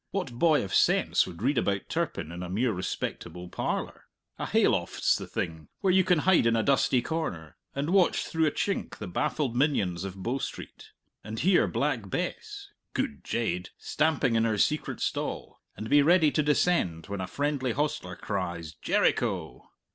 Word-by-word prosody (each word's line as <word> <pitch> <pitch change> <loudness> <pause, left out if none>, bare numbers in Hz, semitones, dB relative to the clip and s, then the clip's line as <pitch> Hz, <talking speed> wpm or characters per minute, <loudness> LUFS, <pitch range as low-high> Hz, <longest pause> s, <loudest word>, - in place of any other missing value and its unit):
What 190 -9 -3
boy 150 +5 +3
of 95 -1 -6
sense - - +3
would 90 +2 -9
read 135 0 +2
about 100 -3 -1
Turpin 80 - -2
in 85 +1 -7
a 90 - -5
mere 115 +6 +1
respectable 90 -1 -5
parlour? - - -3 0.3
A - - -2
hay - - +4
loft's - - +1
the - - -5
thing, 80 -2 -4
where 190 -2 +3
you 190 0 +5
can 180 -1 +3
hide 185 -10 +5
in 115 - +3
a 110 - +2
dusty 135 -2 +3
corner, 105 - -4 0.2
and 140 +4 -1
watch 190 -2 +3
through 160 -1 +1
a - - +1
chink 200 +6 -2
the 105 - -6
baffled 120 - -1
minions 105 - +1
of 95 -1 -6
Bow 125 +6 -1
Street, - - -7 0.3
and 110 +2 -6
hear 185 +1 +4
Black - - -1
Bess 410 -2 -4 0.2
good 265 -4 -2
jade! 90 -6 -2
stamping 150 -6 +1
in 115 - +3
her 110 -2 +1
secret 150 +9 0
stall, - - -3 0.2
and 110 - -5
be 145 +5 +5
ready 160 0 +5
to 155 - +2
descend 145 - +1
when 100 -1 -4
a 90 - -3
friendly 140 -3 -1
hostler 135 -11 -2
cries, 85 -6 -4
"Jericho!" - - 0
125 Hz, 175 wpm, -28 LUFS, -, 0.3 s, you